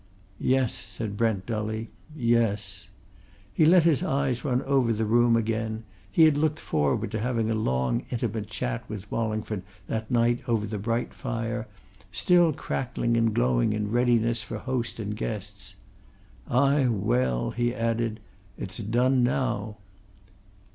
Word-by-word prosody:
"Yes," 130 -2 +2
said 110 -3 -6
Brent 105 -4 0
dully. 110 0 -3 0.2
"Yes." 115 -6 0 0.7
He 155 +9 +4
let 175 0 +7
his 160 -6 +3
eyes 135 -3 0
run 130 -3 0
over 135 -4 +2
the 110 0 0
room 120 +2 +4
again 110 0 -1 0.3
he 165 - +5
had 155 -2 +5
looked 155 0 +1
forward 75 -3 0
to 110 - -2
having 115 -1 0
a - - +2
long, 65 - 0
intimate 115 -3 -2
chat 125 -2 -3
with 105 -2 -7
Wallingford 110 -2 -2 0.2
that 110 +2 -3
night 120 -1 +2
over 110 -3 +1
the 105 0 -4
bright 115 +3 -1
fire, 115 -3 -3 0.4
still 175 - +4
crackling 120 -4 -2
and 115 -1 +3
glowing 60 - +2
in 105 -1 -2
readiness 120 -1 +2
for 110 - -6
host 120 0 -3
and 105 -1 -3
guest. 105 -2 -6 0.7
"Ay, 140 +1 +3
well!" 65 - +1
he 120 0 0
added. 115 -2 -1 0.4
"It's - - -6
done 125 +5 +2
now!" 120 -4 -1
115 Hz, 140 wpm, -27 LUFS, 105-125 Hz, 0.7 s, let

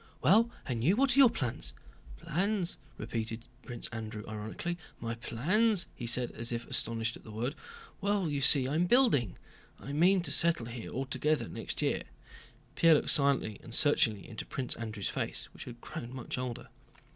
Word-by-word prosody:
"Well, 220 +7 +5 0.2
and 120 -4 -2
you? 175 +9 +4
What 260 +1 +3
are - - +4
your 265 -3 +9
plans?" 120 - 0 0.4
"Plans!" 185 - 0 0.2
repeated 115 0 -4 0.2
Prince 120 -2 -5
Andrew 110 -2 -6
ironically. 110 +11 -4 0.2
"My 115 0 -3
plans?" 180 - +1
he 120 - -5
said, 120 +1 +1
as 115 +1 -2
if 120 0 -3
astonished 115 0 -2
at - - -18
the - - -12
word. 120 +6 -2 0.5
"Well, 200 -2 +1
you 145 -2 -1
see, 135 -1 +6
I'm 160 +6 +1
building. 190 - +4 0.4
I 140 - -7
mean 180 +5 +4
to 145 - -2
settle 165 -4 +3
here 115 -1 -7
altogether 135 0 0
next - - -4
year...." - - +1 0.7
Pierre 165 -1 +6
looked - - +2
silently 140 -7 +2
and 115 - -5
searchingly 115 -9 +3
into 110 - -6
Prince 130 -2 -3
Andrew's 110 -3 -4
face, - - -3
which - - -9
had 120 -1 -9
grown 120 +2 -7
much 130 - -5
older. 125 -2 -5
130 Hz, 170 wpm, -31 LUFS, 115-170 Hz, 0.7 s, your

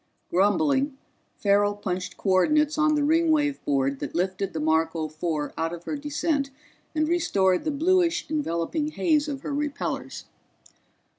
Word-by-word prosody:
Grumbling, 265 - +2 0.4
Farrell 205 0 +2
punched 185 -2 -4
coordinates 300 +11 +2
on 305 0 +3
the 295 - +1
Ringwave 310 -2 +2
board 135 -1 0
that - - -5
lifted 190 +3 -1
the 160 - -4
Marco 160 +1 +1
Four 155 -1 -3
out 165 +1 -1
of 170 0 -8
her 300 - -3
descent 290 0 -1 0.5
and 310 0 +1
restored 200 - +2
the - - +1
bluish 345 +3 +2
enveloping 295 - -1
haze 305 -1 +1
of 280 -2 -4
her 285 - -4
repellors. 290 0 -3
275 Hz, 140 wpm, -25 LUFS, -, 0.5 s, on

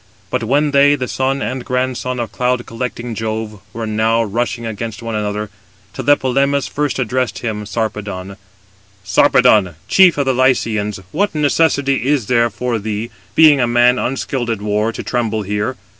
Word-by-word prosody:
But - - -1
when 145 +6 +1
they, 140 +1 +5
the 125 -3 -4
son 135 +2 -1
and 130 0 -3
grandson 125 0 -2
of 115 -3 -3
cloud 125 +1 -1
collecting 120 0 -5
Jove, 110 -1 -4
were 115 0 -5
now 110 +1 +1
rushing 115 +2 -2
against 115 0 -5
one 115 -1 -4
another, 105 0 -3 0.4
Tlepolemus 140 +1 +1
first 145 -2 -2
addressed 130 -4 -1
him 105 -2 -3
[Sarpedon]: 100 -2 -4 0.7
"Sarpedon, 105 - +4
chief 185 -4 +5
of 140 - +1
the 130 - +2
Lycians, 115 -5 +1
what 200 +3 0
necessity 140 -3 +1
is 140 -6 +1
there 120 +1 +2
for 120 +2 -2
thee, 110 +2 -4 0.2
being 150 -4 +6
a 120 - +2
man 120 +1 +4
unskilled 130 -1 -2
in 105 -3 -3
war, 105 +2 0
to - - -7
tremble 110 -3 -1
here? 105 +6 -2
120 Hz, 160 wpm, -17 LUFS, 110-130 Hz, 0.7 s, being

